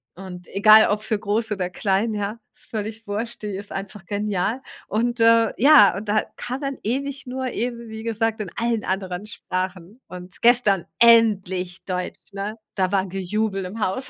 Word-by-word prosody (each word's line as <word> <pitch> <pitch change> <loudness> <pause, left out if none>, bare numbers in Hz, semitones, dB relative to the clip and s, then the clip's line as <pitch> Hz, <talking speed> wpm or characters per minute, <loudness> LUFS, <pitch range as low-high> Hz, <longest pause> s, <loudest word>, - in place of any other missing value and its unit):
Und 180 -1 -10
egal 215 +2 +7
ob 210 +1 0
für 215 0 -1
groß 215 +2 -1
oder 185 -3 -2
klein, 195 +4 0
ja, 210 +2 -3
ist - - -21
völlig 220 0 -5
wurscht, 225 +4 -4
die 210 -2 -4
ist 200 +1 -6
einfach 195 0 -7
genial. 205 +3 -1 0.3
Und, 235 +2 -1
äh, 230 -1 +5
ja, 265 -7 +7
und 205 +1 -6
da 215 +1 +2
kam 255 +2 -4
dann 275 -1 -3
ewig 275 +5 -3
nur 260 +1 -4
eben, 235 0 -4
wie 220 0 -8
gesagt, 225 -1 -1
in 195 - -5
allen 230 -2 0
anderen 190 0 -3
Sprachen 185 +2 -4
und 180 +1 -10
gestern 230 -7 +4
endlich 190 -6 +3
Deutsch, 180 +1 -5
ne, 205 +2 -4 0.2
da 185 -1 0
war 195 -1 +1
Gejubel 195 +2 -2
im 205 +5 -7
Haus. 220 +6 -2
210 Hz, 175 wpm, -23 LUFS, 190-230 Hz, 0.3 s, egal